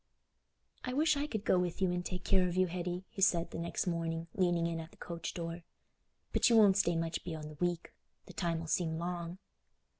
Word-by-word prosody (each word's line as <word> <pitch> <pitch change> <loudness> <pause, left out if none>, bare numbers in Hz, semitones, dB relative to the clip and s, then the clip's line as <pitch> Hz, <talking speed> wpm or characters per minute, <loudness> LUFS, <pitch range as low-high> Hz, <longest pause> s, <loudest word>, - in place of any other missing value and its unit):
"I 250 - -3
wish 305 +3 +3
I 285 +1 -1
could 220 -7 -4
go 185 - +4
with 180 0 -1
you 190 -2 +2
and 180 0 -1
take 180 0 -4
care 185 -1 +3
of 175 - -3
you, 185 0 +4
Hetty," 180 +1 -3
he 215 -4 -6
said, 170 -3 +3
the - - -5
next 170 0 -2
morning, 165 -2 -1
leaning 175 -3 +2
in 165 -1 -1
at 160 0 -7
the - - -20
coach 170 -1 -5
door; 170 0 -4 0.7
"but - - +4
you 230 - +6
won't 205 -3 +7
stay 175 -4 +3
much 165 0 -2
beyond 155 -3 -5
a 150 +3 -5
week—the 175 -1 -5
time 170 -2 -1
'ull 165 - -6
seem 160 -1 0
long." 175 0 -3
175 Hz, 215 wpm, -33 LUFS, 165-185 Hz, 0.7 s, won't